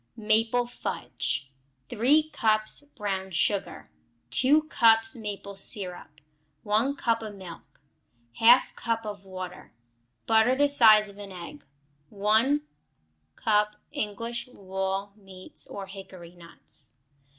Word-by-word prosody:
Maple 225 +3 +2
Fudge 140 - -4 0.4
3 300 +7 +2
cups 215 +1 +1
brown 200 -9 -5
sugar. 190 +3 -1 0.4
2 290 - +4
cups 225 -6 +4
maple 205 -3 -7
syrup. 180 -6 -1 0.4
1 220 +7 +1
cup 230 -4 0
of 215 -2 -7
milk. 180 -6 -12 0.6
1/2 240 +3 +6
cup 230 -1 -2
of 205 -2 -7
water. 185 -1 -8 0.5
Butter 225 +3 +4
the 285 +1 +3
size 220 -6 +6
of 200 0 -14
an 200 -1 -9
egg. 170 -5 -10 0.4
1 220 +8 +2 0.7
cup 210 -2 +1 0.2
English 230 +4 -4
walnut 195 0 -4
meats, 190 -2 -8
or 200 -1 -7
hickory 190 -3 -11
nuts. 170 -1 -11
210 Hz, 110 wpm, -27 LUFS, 195-230 Hz, 0.7 s, 1/2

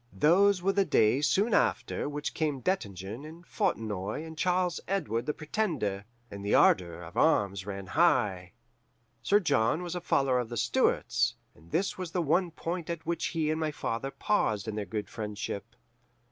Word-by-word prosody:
"Those 185 +4 +4
were 195 +1 +2
the 200 0 +3
days 145 - +3
soon 210 +3 +2
after 200 - +1
which 145 0 -4
came 150 -4 -1
Dettingen 105 - -3
and 165 +3 -11
Fontenoy 105 - -2
and 160 0 -9
Charles 180 +1 +1
Edward 150 - -1
the 150 - 0
Pretender, 155 - -2 0.3
and 100 0 -7
the 100 - +2
ardour 85 -2 +3
of 85 +1 -11
arms 100 - +2
ran 100 -1 -5
high. 100 - +2 0.7
Sir 205 - +4
John 155 - +1
was 175 -1 -4
a 180 - -3
follower 135 -6 +2
of 120 -2 -3
the 120 - -5
Stuarts, - - +1 0.2
and 80 +3 -20
this 190 - -1
was 180 -3 -5
the 180 - +1
one 175 +4 +2
point 170 +1 -5
at 170 -1 -4
which 170 +1 -1
he 160 -2 0
and 155 - -1
my 155 -1 0
father 135 -3 -3
paused 125 - 0
in 110 - -3
their 105 -1 -3
good 105 +2 -4
friendship. 105 0 -5
150 Hz, 175 wpm, -29 LUFS, 105-175 Hz, 0.7 s, Those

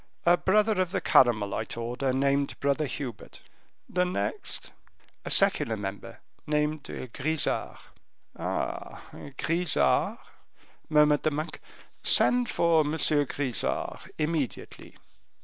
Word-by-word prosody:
"A 175 +1 +6
brother 210 +2 +2
of 185 - -1
the 190 +1 -1
Carmelite 115 - +2
order, 125 +3 -2
named 140 +1 0
Brother 140 +2 0
Hubert." 125 -6 -7 0.5
"The 180 - 0
next?" 180 - -3 0.5
"A - - -4
secular 150 - +4
member, 100 0 -7 0.3
named 150 0 -1 0.3
Grisart." 155 +3 0 0.6
"Ah! - - -4 0.3
Grisart?" 170 +1 +2 0.7
murmured 150 -1 +4
the - - +1
monk, 155 +2 -5 0.4
"send 245 -1 +3
for 170 -1 +3
M. 150 0 0
Grisart 145 -4 -1
immediately." 155 -3 -4
150 Hz, 100 wpm, -27 LUFS, 135-170 Hz, 0.7 s, A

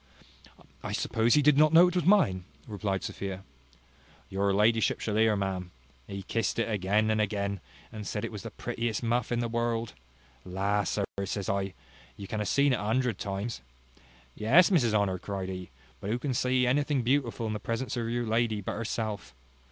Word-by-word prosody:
"I - - -5
suppose 115 +1 +2
he 150 - +4
did 150 0 +5
not 155 +1 +5
know 170 +2 +8
it 180 - -1
was 180 - +1
mine," 165 - +4 0.2
replied 100 -2 -2
Sophia. 95 -1 -5 0.9
"Your 100 +1 +1
ladyship 110 +3 +3
shall 105 - -2
hear, 110 0 +4
ma'am. 95 -2 -2 0.4
He 100 0 -6
kissed 115 +4 -1
it 115 - +1
again 105 +1 +1
and 110 0 +2
again, 100 -1 -1 0.3
and 105 -2 -7
said 105 +2 -2
it 115 - -6
was 105 -3 -7
the - - -6
prettiest 115 -1 -3
muff 120 0 0
in 120 0 +1
the 120 - -1
world. 115 -1 -1 0.5
La! 100 +2 0
sir, 100 +1 0 0.2
says 100 0 -3
I, 100 -1 -1 0.4
you 100 - -7
have 105 -1 -1
seen 140 -1 +3
it 125 - 0
a - - -4
hundred 115 0 0
times. 100 - -4 0.7
Yes, 140 - +5
Mrs 120 - +3
Honour, 100 -3 +1
cried 95 0 -4
he; 90 -1 -6 0.3
but 100 - -5
who 115 - +1
can 135 +1 -2
see 125 +1 +2
anything 140 +1 +1
beautiful 120 -2 0
in 110 - -2
the 105 - -3
presence 115 +5 -3
of 115 -2 -2
your 120 0 -1
lady 110 -1 +1
but 100 - -4
herself? 105 - -4
110 Hz, 190 wpm, -29 LUFS, 100-120 Hz, 0.9 s, know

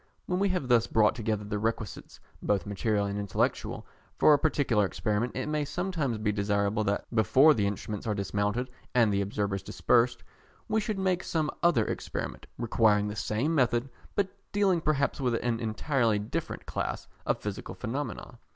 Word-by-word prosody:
When 180 0 -1
we 200 0 +2
have 180 -8 -1
thus 120 -2 +4
brought 110 -1 +4
together 110 -3 -2
the 105 0 -3
requisites, 110 -1 -4 0.2
both 100 -2 0
material 100 +1 0
and 100 0 -2
intellectual, 100 -2 -1 0.3
for 150 - +6
a 145 - +4
particular 140 -8 +2
experiment, 105 +4 -1
it 130 - -2
may 150 0 0
sometimes 155 - -2
be 105 0 0
desirable 100 +1 0
that 100 0 0
before 120 +8 +6
the 105 -5 +1
instruments 105 +1 -4
are 105 - 0
dismounted 105 +5 -1 0.2
and 115 -4 +4
the 100 - +2
observers 100 0 -2
dispersed, 120 +7 +2 0.4
we 220 0 +1
should 215 -1 -2
make 185 -2 0
some 155 -3 -1
other 170 -11 +4
experiment, - - -4
requiring 110 -3 +2
the 105 - -5
same 110 +8 -1
method, 125 -3 +1 0.2
but 200 -2 +1 0.2
dealing 195 -4 +2
perhaps 145 -2 0
with 125 -3 +1
an 115 -1 -1
entirely 115 0 +1
different 105 +1 -4
class - - -3 0.2
of - - +2
physical 105 -1 -6
phenomena. 125 +1 -5
115 Hz, 170 wpm, -29 LUFS, 105-145 Hz, 0.4 s, for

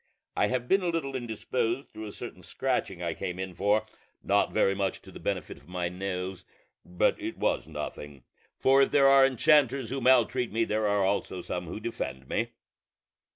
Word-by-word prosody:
I - - +3
have 125 -1 -2
been 195 +7 +4
a 180 - -1
little 155 -5 -2
indisposed 120 +1 -2
through 110 0 -7
a - - -7
certain 115 -4 -8
scratching 95 -1 -2
I 85 -1 -1
came 90 +2 -4
in 95 -1 -4
for, 100 +4 +2 0.4
not - - +2
very 95 - +3
much 100 -1 -1
to - - -12
the - - -10
benefit - - -3
of 70 - -19
my 90 -1 -2
nose: 90 0 -4 0.4
but 90 0 +1
it - - -4
was - - 0
nothing; 70 -3 -7 0.3
for 135 +1 +5
if 135 - +4
there 140 -1 +5
are 135 0 +7
enchanters 135 -2 +3
who 135 0 -2
maltreat 125 -1 +3
me, 115 +2 +1
there 110 0 0
are 100 -1 +2
also 95 -2 -1
some 90 0 -4
who 85 - -5
defend 65 - -5
me. - - -1
110 Hz, 190 wpm, -28 LUFS, 90-130 Hz, 0.4 s, are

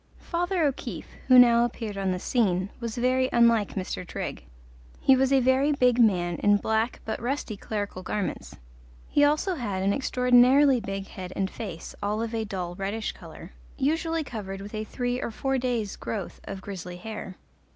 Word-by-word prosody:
Father 350 0 -1
O'Keefe, 280 -3 -3 0.2
who 255 -1 +7
now 235 -1 +7
appeared 225 -3 -3
on 195 -1 -1
the 180 - -1
scene, 190 -3 0
was 230 -2 -5
very 255 +1 +2
unlike 235 -3 +3
Mr. 185 -1 -3
Trigg; 170 - -6 0.5
he 265 - +5
was 265 +1 +2
a 270 - +5
very 260 +3 +3
big 250 -3 +3
man 175 -7 +3
in 205 0 +4
black 220 +3 -1
but 220 +1 -3
rusty 245 -3 -2
clerical 205 -2 -4
garments. 200 +1 -4 0.5
He 290 - +3
also 305 +6 +2
had 205 - -3
an 200 +1 +2
extraordinarily 255 +2 +4
big 195 -2 -5
head 185 -2 -8
and 190 -1 -1
face, 180 -7 -7
all 210 +2 -1
of 230 0 -4
a 225 -1 -1
dull, 185 -4 -4
reddish 200 +4 -3
colour, - - -12 0.3
usually 325 +3 0
covered 200 -7 -6
with 200 +2 -9
a 215 0 -3
three 245 +3 -2
or - - -2
four 270 +4 -1
days' 240 -5 -1
growth 205 -5 -5
of 195 -1 -6
grizzly 180 -3 -7
hair. 210 -1 -7
225 Hz, 175 wpm, -26 LUFS, 195-255 Hz, 0.5 s, who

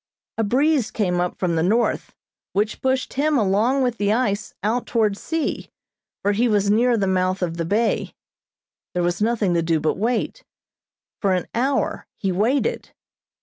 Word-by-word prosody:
A - - +3
breeze 265 +3 +2
came 180 -5 0
up 180 - -2
from 175 -3 0
the 160 - +1
north, 220 +8 0 0.4
which 210 +3 -1
pushed 260 0 0
him 295 +2 +2
along 225 +6 +2
with 245 -2 -1
the 205 0 +2
ice 215 -3 0
out 230 +4 0
toward 220 -4 +1
sea, 320 +8 -3 0.5
for 205 - +3
he 225 +4 +2
was 205 -2 +2
near 235 +2 +3
the 200 - +1
mouth 185 0 0
of 170 -1 -2
the 165 - -1
bay. 220 +6 0 0.8
There 180 - +1
was 175 +2 -1
nothing 215 -4 +1
to 170 - +2
do 165 -1 +1
but 155 +4 -1
wait. 245 - -1 0.8
For 195 -3 +2
an 180 - -2
hour 265 +4 0
he 195 - -1
waited. 250 - 0
210 Hz, 170 wpm, -22 LUFS, 185-245 Hz, 0.8 s, A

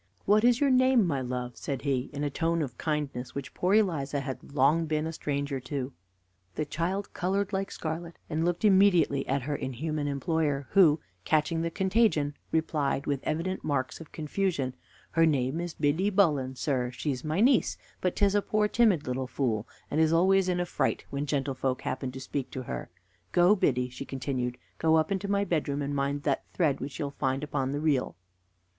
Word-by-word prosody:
"What 210 +2 +4
is 245 0 +5
your 280 -2 +3
name, 255 -3 +5
my 140 -6 0
love?" 125 -1 -4
said 135 -2 -4
he, 135 -3 0
in 145 0 -4
a 145 - -1
tone 165 +2 0
of 125 -4 -6
kindness 145 -5 -3
which 140 -1 -5
poor 185 +3 +2
Eliza 150 -9 +1
had 135 0 -6
long 155 +5 +3
been 155 0 0
a 160 - -3
stranger 140 -2 -2
to. 135 0 -4 0.6
The 155 - -1
child 180 +7 -2
colored 195 +3 -1
like 195 0 -1
scarlet, 165 +1 -5
and 160 0 -1
looked 175 +4 0
immediately 190 -8 +4
at 135 0 0
her 145 +2 -2
inhuman 145 +3 -3
employer, 145 0 0
who, 165 -6 +6 0.2
catching 160 - +1
the 170 - 0
contagion, 190 -5 +2 0.2
replied 150 -4 0
with 140 -2 0
evident 175 +4 -2
marks 140 0 -2
of 160 - -12
confusion: 155 -4 -1 0.4
"Her 165 0 +4
name 140 +1 +1
is 175 -1 -5
Biddy 155 +7 +1
Bullen, 150 -10 +2
sir; 130 -3 -1
she's 125 +1 -3
my 155 +4 -1
niece; 250 +2 +3 0.2
but 180 - 0
'tis 200 -1 +3
a 205 - +3
poor 210 +1 +1
timid 210 -9 +3
little 130 +1 -2
fool, 120 -5 -1 0.2
and 155 - +2
is 160 0 +4
always 185 +3 +4
in 180 -1 +1
a 175 - 0
fright - - -1
when 140 +1 -2
gentlefolks 135 -2 -1
happen 130 0 -3
to 130 - -8
speak 135 +1 -4
to 130 - -5
her. - - -5 0.4
Go, 180 +4 +6
Biddy," 125 - +1
she 130 +2 -7
continued 125 -2 -3 0.2
"go 160 0 +4
up 160 +3 +2
into 195 0 -1
my 200 0 +2
bedroom, 145 -5 -1
and 140 +1 -2
mind 140 +1 -1
that 140 -3 0
thread 155 -6 +2
which 135 +1 -6
you'll 145 -2 -3
find 135 0 -1
upon 135 -3 -1
the 145 - -2
reel." 145 -4 +1
150 Hz, 190 wpm, -28 LUFS, 135-175 Hz, 0.6 s, who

